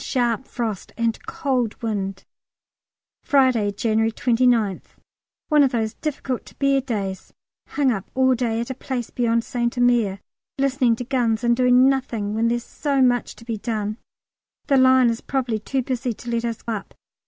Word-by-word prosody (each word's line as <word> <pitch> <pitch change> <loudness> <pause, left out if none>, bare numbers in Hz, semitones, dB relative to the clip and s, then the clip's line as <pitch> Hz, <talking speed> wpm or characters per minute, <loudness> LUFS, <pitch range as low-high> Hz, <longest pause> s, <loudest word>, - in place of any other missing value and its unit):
Sharp 240 0 0
frost 225 -5 -4
and 230 -1 -1
cold 250 -5 -1
wind. 195 -3 -3 1.0
Friday, 255 -7 +3
January 220 +2 +1
29th. 230 -4 +1 0.5
One 300 -2 +5
of 270 -2 +4
those 220 -3 -1
difficult 270 -4 -4
to - - -15
bear 275 -1 +2
days; 200 -7 -4 0.4
hung 280 -3 +1
up 195 -5 -4
all 260 0 +4
day 235 -2 -1
at 235 +3 -3
a - - -2
place 255 -2 -5
beyond 230 -1 +1
St 240 0 -2
Omer, 240 -5 +2 0.4
listening 265 -3 +2
to 245 - -5
guns, 240 -3 0
and 235 0 +3
doing 250 +1 +5
nothing 245 -6 -1
when 225 +2 +1
there's 240 0 0
so 280 -2 -1
much 245 -2 +2
to 230 - -15
be 230 -2 -3
done. 215 -2 -3 0.7
The 275 - +3
line 260 -2 +5
is 230 - -5
probably 250 -5 -1
too 260 +5 -2
busy 245 -1 -2
to 240 - -7
let 235 0 -1
us 230 -1 -4
up. 215 -4 -4
240 Hz, 165 wpm, -22 LUFS, 225-260 Hz, 1.0 s, One